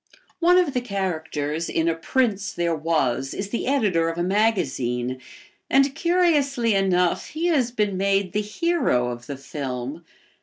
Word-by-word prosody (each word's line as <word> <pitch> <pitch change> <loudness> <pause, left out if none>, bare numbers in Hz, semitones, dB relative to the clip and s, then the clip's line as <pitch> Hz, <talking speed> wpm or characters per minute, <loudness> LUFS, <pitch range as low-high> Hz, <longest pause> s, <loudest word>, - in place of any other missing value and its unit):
One 355 +1 +5
of 350 -6 +2
the 250 - 0
characters 165 -7 -3
in 165 0 0
"A 165 - +3
Prince 210 +3 0
There 170 -1 0
Was" 135 -5 0
is 195 0 -4
the 235 - -3
editor 205 -12 +2
of 165 - -5
a 175 - 0
magazine 135 - 0 0.5
and, 275 0 +4
curiously 290 -8 +2
enough, 180 -3 +1
he 320 +3 -4
has 270 -8 +2
been 210 -5 -1
made 195 -1 +1
the 210 - 0
hero 210 - 0
of 120 0 -8
the 140 - -5
film. 140 0 -5
195 Hz, 155 wpm, -23 LUFS, 155-245 Hz, 0.5 s, One